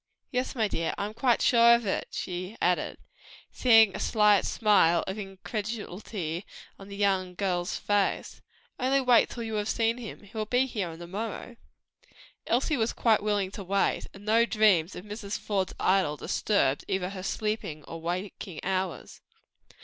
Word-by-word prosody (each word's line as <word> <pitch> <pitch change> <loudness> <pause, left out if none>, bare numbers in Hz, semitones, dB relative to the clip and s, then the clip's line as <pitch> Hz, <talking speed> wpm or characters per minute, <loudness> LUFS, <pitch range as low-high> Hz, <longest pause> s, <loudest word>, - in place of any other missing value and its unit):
Yes, 250 0 -2
my 220 -3 +1
dear, 165 -4 -2
I 200 - -2
am 210 - -6
quite 235 +1 +2
sure 235 -1 +6
of 235 -1 -2
it," 190 - -1
she 185 +4 -5
added, 180 0 0 0.5
seeing 225 -5 +5
a - - -4
slight 210 -3 +3
smile 195 -6 +3
of 190 +3 -4
incredulity 200 -3 -5 0.4
on 195 - -11
the 200 - -8
young 190 -3 0
girl's 180 -2 -1
face; 205 -1 -1 0.4
"only 265 +2 +2
wait 250 -3 +4
till 235 - -6
you 225 -1 -5
have 205 - -4
seen 230 +1 +1
him. 225 -2 -8
He 205 +2 -17
will 215 -1 -2
be 250 +3 +2
here 190 -10 -4
to 175 - -8
morrow." 220 +5 -5 0.9
Elsie 270 +5 +1
was 225 -1 0
quite 225 -3 +3
willing 205 -2 0
to 200 - -7
wait, 195 +2 0
and 200 +1 -14
no 225 +2 +4
dreams 210 -7 +3
of 180 - -8
Mrs. 210 -1 -5
Faude's 195 -3 -2
idol 185 -6 +2
disturbed 140 -10 0
either 190 -1 -1
her 190 -2 -6
sleeping 205 -7 -3
or 165 +2 -8
waking 180 0 -5
hours. 185 -2 -3
205 Hz, 165 wpm, -28 LUFS, 185-225 Hz, 0.9 s, sure